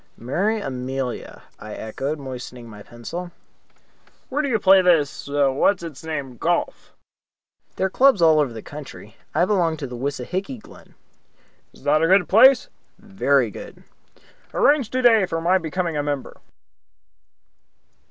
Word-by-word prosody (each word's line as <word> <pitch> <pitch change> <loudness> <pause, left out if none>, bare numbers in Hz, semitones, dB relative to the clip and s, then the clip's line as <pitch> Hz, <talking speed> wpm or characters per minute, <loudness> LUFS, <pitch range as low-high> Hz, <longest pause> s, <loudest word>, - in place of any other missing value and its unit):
"Marry 190 - -1
Amelia," 130 - -5 0.2
I 105 0 -8
echoed, 135 +7 -4
moistening 125 -3 -8
my 105 -2 -12
pencil. 120 - -8 1.0
"Where 285 +3 0
do 295 - -2
you 230 - +2
play 195 -2 +6
this 165 -7 +1
what's 145 +6 +1
its 160 -4 -8
name 145 -6 -5
golf?" - - -2 0.8
"There 190 - 0
are - - 0
clubs 265 -2 +4
all 160 -2 +5
over 145 -4 +1
the 110 -1 -9
country. 135 -7 -11 0.2
I 175 - +3
belong 175 -6 +1
to 145 - -5
the 125 -2 -7
Wissahicky 145 - -4
Glen." - - -17 0.8
"That 150 +2 +1
a 165 - +3
good 190 +1 +4
place?" 255 +6 +6 0.3
"Very 140 - 0
good." - - -11 0.7
"Arrange 285 -6 +3
today 240 -6 +4
for 165 - -2
my 180 +3 +2
becoming 170 0 -3
a - - +1
member." 145 -2 -4
155 Hz, 140 wpm, -22 LUFS, 135-190 Hz, 1.0 s, play